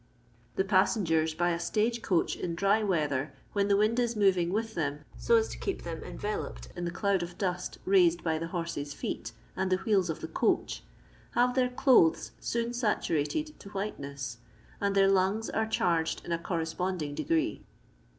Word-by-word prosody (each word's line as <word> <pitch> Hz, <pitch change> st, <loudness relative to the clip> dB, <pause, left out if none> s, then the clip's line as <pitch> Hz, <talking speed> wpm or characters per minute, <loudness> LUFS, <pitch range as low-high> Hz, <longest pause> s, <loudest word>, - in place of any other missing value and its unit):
The 190 Hz, -, +2 dB
passengers 180 Hz, -5 st, +2 dB
by 175 Hz, +1 st, +2 dB
a 170 Hz, -, -1 dB
stage 225 Hz, +6 st, 0 dB
coach 180 Hz, -6 st, +1 dB
in 170 Hz, -2 st, -3 dB
dry 200 Hz, +5 st, +3 dB
weather, 150 Hz, -8 st, 0 dB, 0.2 s
when 200 Hz, -1 st, +2 dB
the 200 Hz, -1 st, +4 dB
wind 215 Hz, +4 st, +2 dB
h 235 Hz, -1 st, +1 dB
moving 185 Hz, -4 st, +3 dB
with 220 Hz, +2 st, -1 dB
them 145 Hz, -4 st, -3 dB
so 470 Hz, -, +2 dB
as 450 Hz, -1 st, +3 dB
to -, -, -7 dB
keep 390 Hz, -, -3 dB
them 165 Hz, -2 st, -5 dB
enveloped -, -, -5 dB
in 175 Hz, -, -3 dB
the -, -, -1 dB
cloud 195 Hz, +1 st, +1 dB
of 175 Hz, 0 st, -6 dB
dust 180 Hz, -2 st, -2 dB
raised 175 Hz, -3 st, +4 dB
by 160 Hz, -2 st, 0 dB
Uie 165 Hz, -, -3 dB
horses* 165 Hz, -4 st, -4 dB
feet 110 Hz, -, -4 dB, 0.2 s
and 190 Hz, 0 st, -1 dB
the -, -, +5 dB
wheels 190 Hz, -2 st, +1 dB
of 160 Hz, -, -3 dB
the -, -, -4 dB
coach, 160 Hz, -, 0 dB, 0.5 s
have 245 Hz, +1 st, +3 dB
their 250 Hz, -1 st, +2 dB
clothes 250 Hz, -, +4 dB
soon 235 Hz, 0 st, -2 dB
saturated 240 Hz, -, -1 dB
to 200 Hz, -, -11 dB
white 200 Hz, +1 st, -4 dB
ness, 140 Hz, -4 st, -6 dB, 0.4 s
and 200 Hz, -1 st, +1 dB
their 195 Hz, 0 st, +5 dB
lungs 195 Hz, +3 st, +2 dB
are 220 Hz, 0 st, 0 dB
charged 170 Hz, -6 st, 0 dB
in -, -, -5 dB
a 170 Hz, -, +1 dB
correspond 170 Hz, +1 st, -2 dB
inff 145 Hz, -1 st, -4 dB
degree. 165 Hz, -1 st, 0 dB
185 Hz, 185 wpm, -30 LUFS, 165-215 Hz, 0.5 s, the